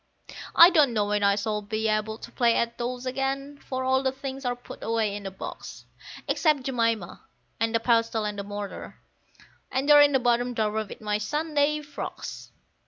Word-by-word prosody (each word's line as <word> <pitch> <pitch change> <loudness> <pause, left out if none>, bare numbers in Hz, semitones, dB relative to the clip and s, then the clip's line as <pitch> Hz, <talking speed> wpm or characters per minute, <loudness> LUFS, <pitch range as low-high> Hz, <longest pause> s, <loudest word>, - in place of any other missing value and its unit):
I 340 +2 +9
don't 295 -7 +4
know 210 -2 +1
when 205 0 0
I 200 0 +4
shall 210 +1 -2
be 215 +2 -2
able 215 0 -1
to 235 - -11
play 235 -2 +2
at 235 0 0
dolls 245 +1 -3
again, 270 +2 -3
for 260 -1 -4
all 260 0 +2
the 265 -1 0
things 270 0 -7
are 245 0 0
put 245 - -12
away 220 -3 0
in 205 -1 -6
a - - -3
box; 190 - -9 0.4
Except 305 -5 +2
Jemima 230 -8 -1 0.4
and 225 +1 0
the - - +3
pestle 230 -2 +1
and 205 -1 -3
mortar, 205 0 -7 0.7
and 265 +2 -1
they're 295 -1 +8
in 290 -1 +5
the 265 - +4
bottom 245 0 +1
drawer 215 0 0
with - - -10
my 210 -1 -1
Sunday 300 +5 0
frocks. 295 - -7
235 Hz, 185 wpm, -26 LUFS, 215-270 Hz, 0.7 s, I